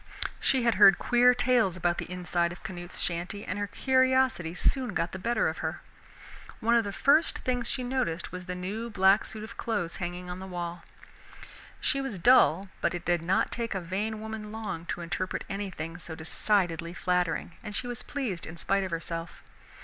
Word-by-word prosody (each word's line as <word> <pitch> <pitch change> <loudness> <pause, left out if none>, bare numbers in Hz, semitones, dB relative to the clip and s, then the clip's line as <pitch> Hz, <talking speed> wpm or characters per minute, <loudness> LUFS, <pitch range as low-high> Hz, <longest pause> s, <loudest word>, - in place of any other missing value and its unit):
She 260 -2 +2
had 230 -4 +2
heard 195 -2 +9
queer 245 0 +5
tales 245 -7 +3
about 175 0 0
the - - -5
inside 175 -1 0
of 175 - -11
Canute's 175 -1 -6
shanty, 180 +4 -2
and - - -3
her 205 - -1
curiosity 260 -8 +2
soon 250 +2 0
got 165 - 0
the 190 - -6
better 235 +5 +1
of - - -3
her - - -4
rage. - - -18
One 235 +2 +2
of 235 -1 +5
the 200 - -3
first 285 +10 +4
things 245 -2 0
she 255 - -2
noticed 245 -11 -1
was 180 0 -7
the 180 0 -4
new 205 +6 -4
black 195 0 +4
suit 215 -1 -7
of 225 +1 -9
clothes 175 -7 -1
hanging 175 0 -4
on 180 +1 -5
the 190 - -7
wall. 175 -1 -5 1.0
She 275 - 0
was 270 -7 -4
dull, 195 -3 +5
but - - +1
it 175 - -6
did 175 -2 +2
not 180 +3 +1
take 230 -3 -3
a - - 0
vain 200 +5 -3
woman 220 -1 -6
long 215 -7 -5
to - - -3
interpret 175 +2 -3
anything 180 -5 -5
so 165 -2 -8
decidedly 170 0 0
flattering, 180 -2 0
and 210 -2 -6
she 250 - -2
was 245 0 -4
pleased 240 - -4
in 160 +1 -8
spite 195 +3 +1
of 190 - -3
herself. 165 0 -5
190 Hz, 195 wpm, -29 LUFS, 175-230 Hz, 1.0 s, heard